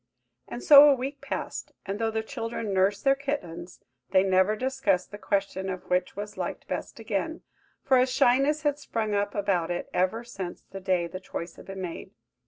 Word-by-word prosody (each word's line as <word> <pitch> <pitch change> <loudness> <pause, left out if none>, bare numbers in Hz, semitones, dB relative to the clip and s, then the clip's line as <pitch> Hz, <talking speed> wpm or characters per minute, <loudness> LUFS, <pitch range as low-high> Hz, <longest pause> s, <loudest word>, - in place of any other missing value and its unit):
And 240 - -7
so 290 0 +10
a 280 - +5
week 270 +3 -5
passed; - - -5
and 200 +1 -4
though 225 -1 +1
the 220 0 -2
children 230 -2 -4
nursed 195 +2 +2
their 275 - +5
kittens, 270 - -5 0.3
they 185 0 +4
never 190 +2 +3
discussed 220 -7 0
the 205 - -8
question 195 -2 -1
of 185 -1 -6
which 180 0 +1
was 205 +1 -6
liked - - -4
best - - -5
again, 225 - -3 0.4
for 260 -2 +4
a 255 - +4
shyness 270 +4 +3
had 290 -1 +1
sprung 225 -6 -2
up 205 0 0
about 195 -5 0
it 175 0 -3
ever 185 +6 +1
since 195 -7 -7
the 195 - -9
day 185 -2 +1
the 185 +2 -6
choice 170 -2 -6
had - - -12
been 195 0 -6
made. 170 -2 -6
205 Hz, 190 wpm, -27 LUFS, 185-255 Hz, 0.4 s, so